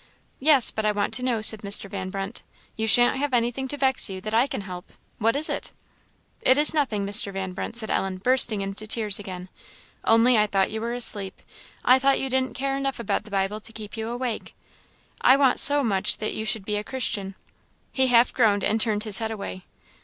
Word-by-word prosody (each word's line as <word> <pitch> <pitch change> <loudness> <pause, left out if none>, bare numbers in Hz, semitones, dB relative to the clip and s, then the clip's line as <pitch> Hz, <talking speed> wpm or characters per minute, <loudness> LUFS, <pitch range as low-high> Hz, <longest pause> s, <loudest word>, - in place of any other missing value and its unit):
"Yes, 280 -3 +4
but 220 - -4
I 210 - +1
want 205 -1 -3
to 250 - -1
know," 240 -4 -1
said 220 -1 +6
Mr. 200 0 +1
Van 190 -2 -6
Brunt; 195 +3 -6 0.3
"you 220 0 -3
shan't 245 +3 +5
have 285 -2 -1
anything 245 +3 -2
to 290 - -6
vex 265 -4 +1
you 190 -1 -7
that 215 +2 -6
I 235 +4 +2
can - - -5
help; 180 -2 -10 0.3
what 225 +3 +1
is 300 +2 +2
it?" - - -5 0.7
"It 260 - +3
is 300 +2 +5
nothing, 240 -10 -1
Mr. 200 0 +1
Van 190 -1 -5
Brunt," 210 +4 -6
said 220 -2 0
Ellen, 190 -1 -2
bursting 230 0 +2
into 195 +2 -4
tears 215 -3 +4
again 185 -2 -9 0.6
"only 230 +1 +3
I 210 - +2
thought 195 -1 0
you 220 0 -5
were 235 +1 -4
asleep 205 -5 +1 0.5
I 255 - +6
I - - -5
thought 275 +1 +1
you 265 -1 -4
didn't 260 0 -1
care 270 0 -2
enough 275 -2 -4
about 220 -1 -3
the - - -13
Bible 195 +1 -2
to 225 - -8
keep 215 -1 -9
awake 235 +1 -5 0.7
I 260 - +5
want 270 -3 +2
so 290 0 +7
much 195 -5 0
that 215 - -4
you 220 - -5
should 215 -2 -2
be 210 0 -2
a 210 - -4
Christian!" 205 -6 -3 0.6
He 265 -1 +1
half 240 -1 +3
groaned, 210 -5 +1
and 220 +1 +1
turned 215 -2 -1
his 210 -3 +1
head 225 -1 -3
away. 200 -3 -8
220 Hz, 220 wpm, -23 LUFS, 200-255 Hz, 0.7 s, so